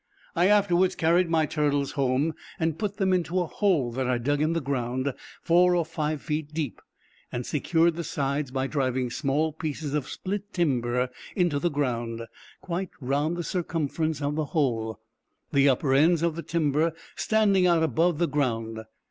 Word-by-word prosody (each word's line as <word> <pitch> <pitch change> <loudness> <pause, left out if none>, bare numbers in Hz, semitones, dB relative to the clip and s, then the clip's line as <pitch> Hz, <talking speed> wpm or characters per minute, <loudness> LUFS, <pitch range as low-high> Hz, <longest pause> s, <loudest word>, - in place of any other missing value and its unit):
I 175 +2 +4
afterwards 185 -3 +3
carried 170 +1 +3
my 160 -1 +3
turtles 145 -2 0
home, 140 +3 +1 0.3
and 160 -1 -1
put 205 -2 -2
them 190 -1 +2
into 180 0 +1
a 175 - +1
hole 160 - +1
that 130 +1 -2
I 125 -1 +2
dug 145 +5 0
in 155 +2 +2
the 165 - +1
ground, 130 -1 -2 0.3
four 180 +1 +4
or 170 -2 +1
five 155 -2 -3
feet 150 -1 -3
deep, 150 -7 -3 0.5
and 120 0 -3
secured 165 +3 +2
the 170 - -3
sides 140 -1 -2
by 130 +1 -1
driving 130 -3 -1
small 150 +4 0
pieces 155 -2 -4
of 145 -2 -1
split 200 +2 -5
timber 125 -6 0 0.2
into 175 -7 +2
the 175 - +1
ground, 120 -6 -2 0.4
quite 180 +1 -3
round 145 +5 0
the 175 - -2
circumference 160 -3 -2
of 145 +1 0
the 155 0 -1
hole, 115 -8 -1 0.5
the 140 0 +5
upper 135 +1 +2
ends 160 +4 +4
of 170 -2 +1
the 170 - -4
timber 160 -1 +1 0.2
standing 200 -4 +3
out 170 -2 +3
above 160 +3 +2
the 170 +1 +2
ground. 115 -6 -1
150 Hz, 175 wpm, -26 LUFS, 135-170 Hz, 0.5 s, the